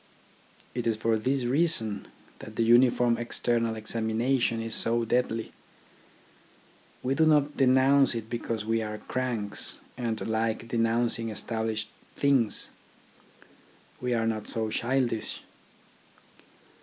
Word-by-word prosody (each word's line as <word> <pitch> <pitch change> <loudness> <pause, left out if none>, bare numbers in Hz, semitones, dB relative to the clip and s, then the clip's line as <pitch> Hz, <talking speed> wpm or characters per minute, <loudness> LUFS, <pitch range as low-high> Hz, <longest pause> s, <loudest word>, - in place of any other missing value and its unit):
It 120 -1 -2
is 115 - +2
for 115 +1 +1
this 130 +4 0
reason 120 -5 +1 0.3
that 110 - -10
the 115 - +1
uniform 120 0 +4
external 115 -1 0
examination 115 +2 0
is 115 0 -3
so 115 0 +2
deadly. 115 -1 0 1.5
We 130 - +1
do 160 - +3
not 150 -1 +3
denounce 135 0 +4
it 115 -1 -4
because 115 -2 -3
we 115 0 +1
are 105 -1 -4
cranks, 110 -3 -3 0.2
and 115 -3 -2
like 110 +1 -1
denouncing 115 0 +1
established 110 0 -3 0.3
things. 135 -7 +2 1.3
We 125 -1 0
are 115 -1 0
not 110 -2 -2
so 110 -1 -1
childish. 120 -2 -1
115 Hz, 115 wpm, -28 LUFS, 110-125 Hz, 1.5 s, uniform